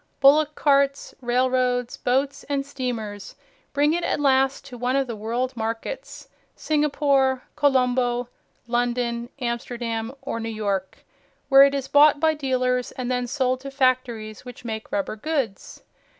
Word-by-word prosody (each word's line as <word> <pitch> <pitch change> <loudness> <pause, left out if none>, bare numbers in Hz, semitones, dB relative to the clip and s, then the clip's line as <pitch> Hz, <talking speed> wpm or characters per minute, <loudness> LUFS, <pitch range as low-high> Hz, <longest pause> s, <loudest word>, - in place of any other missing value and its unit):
Bullock 300 +2 +5
carts, 280 -1 +2
railroads, 250 0 +1
boats 270 +3 -1
and 280 -1 -2
steamers 230 -7 -5 0.4
bring 290 +2 +2
it 345 +1 -1
at - - 0
last 270 -1 +2
to 250 - -10
one 250 +2 -1
of 275 -1 +2
the 235 -3 -5
world 240 +4 -2
markets, 225 - -5 0.3
Singapore, 280 -3 +1
Colombo, 250 -4 +2 0.4
London, 240 0 -1
Amsterdam 235 -2 -3
or 230 - -3
New 225 0 -4
York, 200 -4 -3 0.4
where 275 0 +9
it 280 0 +1
is 270 -1 -3
bought 290 0 +6
by 315 +1 +3
dealers, 255 -3 0
and 255 -1 -4
then 250 -1 -1
sold 255 -1 0
to 275 +1 -7
factories 255 -5 0
which 250 -1 -11
make 220 -1 -5
rubber 200 +1 -2
goods. 265 -4 -3
255 Hz, 140 wpm, -24 LUFS, 235-275 Hz, 0.4 s, where